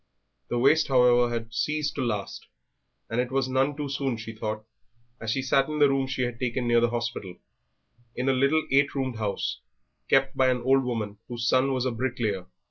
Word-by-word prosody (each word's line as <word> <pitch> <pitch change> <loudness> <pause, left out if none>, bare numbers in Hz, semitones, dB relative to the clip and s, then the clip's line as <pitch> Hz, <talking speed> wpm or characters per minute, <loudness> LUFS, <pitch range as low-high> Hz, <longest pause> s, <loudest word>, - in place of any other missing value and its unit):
The 120 - -2
waste, 140 +6 +4
however, 125 -2 +4
had 115 -1 -4
ceased 150 +3 -1
at - - +1
last, 105 -4 -4 0.6
and 120 +2 0
it 125 0 -4
was 135 -1 +1
none 135 +2 +1
too 145 -1 -3
soon, 135 -3 -2
she 115 0 -7
thought, 110 0 -4 0.5
as 110 - -5
she 130 +4 0
sat 135 +1 +2
in 150 - -3
the 145 -1 +5
room 135 -1 +1
she 130 -1 -2
had 120 -1 -3
taken 125 -1 -1
near 120 0 +4
the 120 0 +2
hospital, 120 -6 -4 0.8
in 125 +2 -2
a 135 - +4
little 140 +4 +2
eight 140 +1 +3
roomed 130 -4 -2
house, 105 -2 -2 0.5
kept 135 0 +3
by 130 - +3
an 125 -1 +1
old 135 +1 +4
woman 110 -4 -3
whose 120 -2 -3
son 130 +2 +3
was 130 -1 -1
a 130 - +1
bricklayer. 115 -6 -2
125 Hz, 205 wpm, -26 LUFS, 115-135 Hz, 0.8 s, the